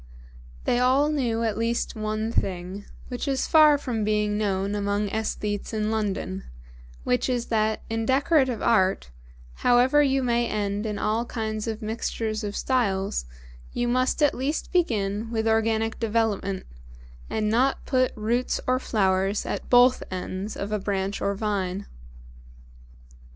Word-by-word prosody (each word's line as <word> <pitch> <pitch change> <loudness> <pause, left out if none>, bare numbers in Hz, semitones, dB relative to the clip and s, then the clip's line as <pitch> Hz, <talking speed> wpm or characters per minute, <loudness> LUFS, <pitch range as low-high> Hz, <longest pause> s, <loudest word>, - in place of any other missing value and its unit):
They 245 - +1
all 265 +4 +3
well - - 0
knew 235 -6 0
at 220 -1 -1
least 230 +1 -1
one 215 +1 -2
thing, 185 0 -2 0.2
which 250 +2 -4
is 270 -2 0
far 305 -2 +6
from 245 -6 -3
being 210 0 +1
known 200 -1 -1
among 205 0 -1
æsthetes 210 0 -3
in 215 0 0
London, 200 - -2 0.6
which 125 - +1
is 245 -2 -1
that 215 0 +1
in 225 0 -2
Decorative 265 -3 +2
Art, 190 - +2 0.5
however 250 +4 +4
you 270 -2 +2
may 240 -1 +1
end 205 0 -2
in 210 -1 -3
all 220 +3 0
kinds 220 -2 -4
of 220 0 -4
mixtures 220 0 -3
of 205 -1 -3
styles, 195 - 0 0.5
you 240 - -1
must 255 +5 +1
at 290 - +4
least 275 +5 -2
begin 220 - 0
with 225 -1 -1
organic 225 0 +1
development, 215 -4 -1 0.6
and 215 -1 -1
not 245 +5 +1
put 255 -2 +2
roots 235 +4 0
or 255 0 +2
flowers 195 -3 +1
at - - -4
both 245 +1 +6
ends 185 +2 -5
of 200 +1 -4
a 210 - 0
branch 195 0 -2
or 200 - 0
vine. 200 -2 -2
220 Hz, 145 wpm, -25 LUFS, 205-245 Hz, 0.6 s, far